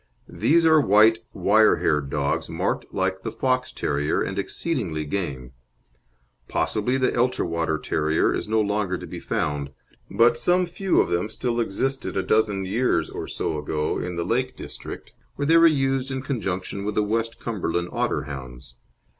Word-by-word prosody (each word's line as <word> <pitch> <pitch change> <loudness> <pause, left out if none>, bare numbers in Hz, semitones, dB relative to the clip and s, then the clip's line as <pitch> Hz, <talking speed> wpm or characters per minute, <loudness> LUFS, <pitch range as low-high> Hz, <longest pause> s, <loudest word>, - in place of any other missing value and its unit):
These 165 +2 +2
are 160 -1 +6
white 110 -1 +5
wire 105 +4 +4
haired 75 -2 0
dogs 70 0 -1
marked - - -2
like 95 0 -1
the - - -4
Fox 130 -1 0
terrier, 75 +1 -1
and 95 +1 -2
exceedingly 100 - -2
game. 70 -8 -4 1.0
Possibly 120 +5 0
the 130 - +2
Elterwater 85 -10 0
Terrier 80 +1 +1
is - - -3
no 110 +1 +2
longer 105 -3 0
to - - -8
be - - -7
found, 70 -1 -2 0.4
but 120 0 +4
some 180 +1 +3
few 180 +2 0
of - - -1
them 85 +5 0
still 120 +1 -2
existed 130 +3 -1
a 95 - +1
dozen 105 -3 +1
years 120 +7 0
or - - -5
so 75 - -2
ago 75 +1 -2
in 90 -1 -4
the 85 0 -2
Lake 125 +6 -1
District, - - -8 0.2
where 145 - -2
they 165 +3 +5
were 165 0 +8
used 135 -3 +1
in 130 -1 -3
conjunction 100 -7 -3
with 105 0 -3
the 105 - +2
West 115 +2 -2
Cumberland 85 -6 -2
Otterhounds. 65 -3 -4
105 Hz, 165 wpm, -24 LUFS, 85-130 Hz, 1.0 s, were